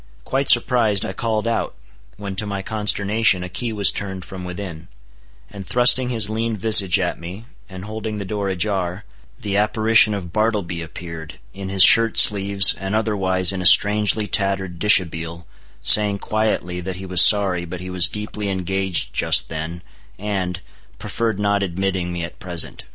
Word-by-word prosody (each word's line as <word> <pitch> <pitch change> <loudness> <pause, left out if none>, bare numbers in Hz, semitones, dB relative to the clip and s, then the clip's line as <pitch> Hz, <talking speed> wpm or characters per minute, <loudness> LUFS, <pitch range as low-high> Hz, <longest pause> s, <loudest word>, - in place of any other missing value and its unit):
Quite 135 +1 -2
surprised, 115 -4 +3
I 95 - -6
called 110 +1 -3
out; 115 - -3 0.4
when 100 -2 -7
to 105 - -2
my 100 -1 -5
consternation 105 -2 0
a 90 - -7
key 115 +6 -4
was 100 -3 +2
turned 95 -3 -5
from 90 0 -9
within; 90 -2 -8 0.6
and 100 -1 -9
thrusting 125 +1 +3
his 110 -5 +1
lean 110 +1 -3
visage 100 -3 +5
at 90 -2 -3
me, 90 +6 -10 0.2
and 95 0 -10
holding 110 0 -6
the 100 - -6
door 100 0 -4
ajar, 95 0 -3 0.3
the 100 -1 -3
apparition 110 0 +2
of 90 -4 -8
Bartleby 105 -6 -2
appeared, 80 0 -9 0.2
in 95 -1 -8
his 95 -1 +4
shirt 115 +2 +5
sleeves, 100 -1 +5
and 95 +2 -4
otherwise 95 -4 +1
in 95 -1 -5
a - - -5
strangely 105 +3 +3
tattered 95 -4 -1
dishabille, 85 -4 +1 0.4
saying 105 +5 +6
quietly 100 -5 -3
that 95 +1 -6
he 95 +1 -9
was 90 -2 +2
sorry, 95 -4 +4
but 85 +1 -8
he 90 +1 -8
was 90 -1 +3
deeply 105 -1 -6
engaged 95 -1 -3
just - - 0
then, 80 +2 -7 0.3
and—preferred 95 +2 -5
not 100 0 0
admitting 95 -1 -3
me 85 -1 -5
at 85 - -9
present. 85 -3 -3
95 Hz, 160 wpm, -19 LUFS, 90-105 Hz, 0.6 s, saying